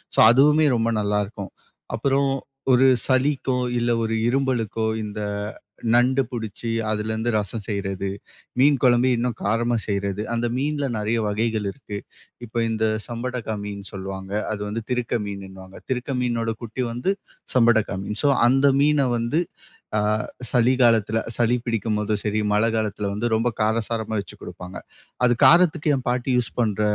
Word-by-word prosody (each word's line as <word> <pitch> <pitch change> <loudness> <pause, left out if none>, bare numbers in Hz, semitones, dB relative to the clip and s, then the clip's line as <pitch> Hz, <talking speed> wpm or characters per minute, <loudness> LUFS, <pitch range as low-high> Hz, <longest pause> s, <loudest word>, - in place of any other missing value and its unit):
So - - +5
அதுவுமே 150 +4 +5
ரொம்ப 115 +1 +1
நல்லா 105 0 +1
இருக்கும். 100 -1 -8 0.4
அப்புறம் 140 0 +1 0.4
ஒரு 130 +2 +5 0.2
சளிக்கோ, 130 -1 +1 0.2
இல்ல 120 0 +1
ஒரு 115 - -2 0.2
இருமலுக்கோ, 120 -4 0 0.2
இந்த 105 0 -5 0.7
நண்டு 130 +3 +4
புடிச்சு 115 -1 -5 0.2
அதுலருந்து 110 +2 -1
ரசம் 105 +1 -2
செய்றது, 95 -1 -2 0.5
மீன் 140 +1 +5
கொழம்பு 125 -1 +4
இன்னும் 120 -1 -1
காரமா 115 +3 +1
செய்றது, 100 0 -2
அந்த 120 +1 0
மீன்ல 145 +1 -1
நெறைய 110 +2 0
வகைகள் 110 0 -1
இருக்கு. 105 -5 -8 0.5
இப்ப 115 +1 -2
இந்த 110 0 0 0.2
சம்படகா 120 -1 -4
மீன் 100 -1 -6
சொல்லுவாங்க, 95 0 -6 0.2
அது 105 -1 -4
வந்து 110 +2 -4
திருக்க 125 -1 0
மீன்னுவாங்க. 95 -1 -8
திருக்க 130 +2 -2
மீனோட 115 -2 0
குட்டி 120 +2 -4
வந்து 125 +12 0 0.4
சம்படகா 115 -4 +4
மீன். 105 +2 -5
சோ 145 - +4 0.2
அந்த 135 +3 +4
மீன 145 -2 +3
வந்து 120 +8 0 0.6
அ - - +2 0.5
சளி 125 0 +4
காலத்துல 115 -1 +3 0.2
சளி 120 0 +3
பிடிக்கும்போதும் 105 -2 -1
சரி, 105 0 0
மழ 105 - +3
காலத்துல 105 -2 -1
வந்து 105 +4 -2
ரொம்ப 115 +2 +1
காரசாரமா 110 0 -1
வச்சு 100 - -12
குடுப்பாங்க. 90 +1 -8 0.5
அது 120 - +4
காரத்துக்கு 170 -3 +5
என் 130 - -6
பாட்டி 125 +1 -1
யூஸ் 120 - -2
பண்ற 105 -2 0
115 Hz, 145 wpm, -23 LUFS, 105-125 Hz, 0.7 s, சோ